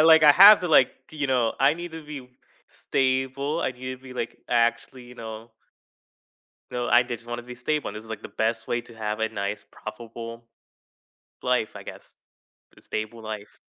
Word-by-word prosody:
like, 160 0 +7
I 150 - +10
have 200 +6 +10
to 180 - -2
like, 160 - +6 0.2
you 150 -2 -2
know, 125 -4 +1
I 140 +3 +5
need 175 0 -7
to 160 -1 -8
be 140 -4 -8 0.4
stable, 135 +3 -1
I - - 0
need 130 0 -7
to - - -24
be, 130 -1 -10
like, 115 - -4
actually, 120 +1 0
you 125 0 -13
know 110 0 -8 1.2
No, 120 0 -2
I 120 +1 +6
did 120 -1 -5
just 115 +1 -15
want 120 - -3
to 120 - -6
be 125 - -8
stable 150 +5 -1
and 105 - -7
this 105 - -7
is, 110 - -14
like, 110 - -6
the - - -7
best 110 +2 -1
way 120 - 0
to 120 0 -15
have 110 -1 -3
a 110 - +1
nice 100 -1 -4
profitable 115 +1 -9 1.0
life, 125 -4 0
I - - -8
guess - - -11 0.6
the - - -19
stable 110 +1 -5
life. 110 -1 -7
120 Hz, 200 wpm, -25 LUFS, 115-135 Hz, 1.2 s, I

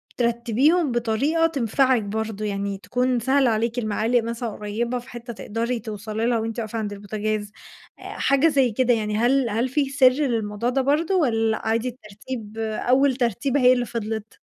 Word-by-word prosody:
بترتّبيهم 245 +7 +2
بطريقة 240 +8 +1
تنفعِك 260 -4 +1
برضه؟ 215 0 -3
يعني 200 -1 -2
تكون 250 +4 0
سهلة 265 +2 +3
عليكِ، 230 +2 0
المعالق 225 +2 +1
مثلًا 235 +1 -3
قريبة 220 +4 -3
في 245 +2 -14
حِتّة 240 -1 -8
تقدري 230 +3 -3
توصلي 220 0 -4
لها 235 -1 +2
وأنتِ 225 +1 -3
واقفة 225 0 -4
عند 205 -2 -3
البوتاجاز، 205 +1 -3 0.5
آآ - - -14 0.2
حاجة 275 +3 +3
زي 270 -6 +3
كده 245 +2 +2
يعني، 210 -2 -1
هل 245 +2 +2
هل 230 +4 0
فيه 275 +1 0
سِرّ 270 -2 +6
للموضوع 235 -5 -1
ده 270 +2 +1
برضه، 305 +7 +1
والّا 225 -9 +2
عادي 225 +2 +1
الترتيب، 220 -1 -9
أول 250 +5 +2
ترتيبة 250 +3 0
هي 250 0 +7
اللي 245 -1 0
فضِلت؟ 220 -2 -5
235 Hz, 165 wpm, -23 LUFS, 220-255 Hz, 0.5 s, هي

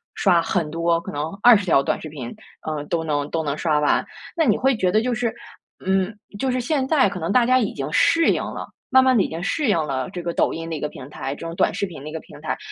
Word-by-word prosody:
刷 180 -4 +3
很 165 -2 -1
多， 165 +1 +1
可 - - -7
能 145 +1 -2 0.2
20 220 -5 +7
条 140 -4 +4
短 - - -1
视 155 - -7
频， 130 -5 -7 0.3
呃， 155 -2 -3
都 160 +1 -1
能 145 -2 -1
都 160 -1 -1
能 145 -1 -2
刷 155 -3 +1
完。 150 - +2 0.3
那 330 - +2
你 215 -4 +3
会 270 0 +2
觉 185 -4 +1
得 215 +3 +3
就 250 - 0
是 235 0 -1 0.5
嗯， 190 +2 +1 0.2
就 265 - 0
是 255 - 0
现 265 +1 0
在 285 -7 +4
可 185 - -6
能 165 +4 -2
大 245 0 +4
家 255 +1 +4
已 215 - -1
经 140 +1 -4
适 330 0 +4
应 - - -1
了， - - -6 0.2
慢 260 0 +6
慢 260 -1 +4
地 195 - +4
已 - - -3
经 165 +1 -5
适 290 +5 0
应 205 - +3
了 130 -4 -3
这 175 - -6
个 170 0 -3
抖 - - +2
音 165 0 -5
的 165 - -3
一 - - -5
个 150 - -2
平 135 0 -11
台， 135 -2 -5
这 165 - -9
种 165 - -6
短 - - +2
视 - - -1
频 165 -7 -9
的 155 - -6
一 - - -9
个 160 - -5
平 - - -14
台， - - -2
170 Hz, 300 characters per minute, -22 LUFS, 155-235 Hz, 0.5 s, 20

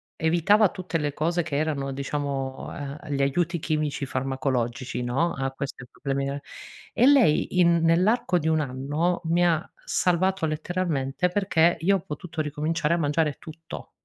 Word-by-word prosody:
evitava 175 +6 +3
tutte 185 -3 -3
le 145 -2 -2
cose 170 +4 0
che 155 -3 -3
erano, 145 -3 -1
diciamo, 135 -1 -3
ehm, 145 +2 -7
gli 140 - 0
aiuti 170 +5 +1
chimici, 150 -3 -1
farmacologici, 130 -1 -2
no, 135 +8 0
a 135 -1 -2
questi 135 -1 -6
problemi 140 -1 -2
de 140 +1 -4 0.5
e 245 - +3
lei 250 - +4
in 170 -1 +5
nell'arco 180 +3 +3
di 160 - -2
1 160 -1 +2
anno, 145 +6 -1
mi 170 +2 +3
ha 165 -2 +2 0.2
salvato 185 - +1
letteralmente, 155 -1 -1
perché 175 -3 +2
io 195 +3 +3
ho - - -6
potuto 160 0 -5
ricominciare 155 +2 0
a - - -1
mangiare 150 -1 +1
tutto. 165 +1 -10
155 Hz, 155 wpm, -25 LUFS, 140-175 Hz, 0.5 s, in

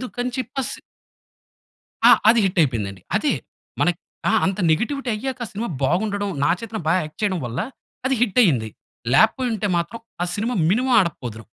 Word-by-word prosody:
అందుకని 250 0 -3
చెప్పి 260 +2 -3
స్ - - -5 1.3
ఆ! - - +9 0.2
అది 230 0 +5
హిట్ 185 -1 0
అయిపోయిందండి. 105 - -1
అదే, - - +2 0.5
మన 175 - +4 0.4
ఆహ్, - - +4
అంత 190 +1 -1
నెగెటివిటీ 260 - -1
అయ్యాక 265 +3 -4
ఆ - - -8
సినిమా 220 +4 -3 0.2
బాగుండడం, 200 +6 0
'నాగచైతన్య' 185 +4 -1
బా 165 - +4
యాక్ట్ 155 - -11
చేయడం 190 -4 +1
వల్ల 120 +2 -4 0.5
అది 265 0 +2
హిట్ 245 +1 +2
అయింది. 125 - +2 0.4
లేకపోయింటే 220 - +3
మాత్రం, 175 +7 -2 0.2
ఆ - - +2
సినిమా 225 +4 -1 0.2
మినిమమ్ 250 +6 +1
ఆడకపోదును. 125 - -3
205 Hz, 155 wpm, -22 LUFS, 165-240 Hz, 1.3 s, ఆ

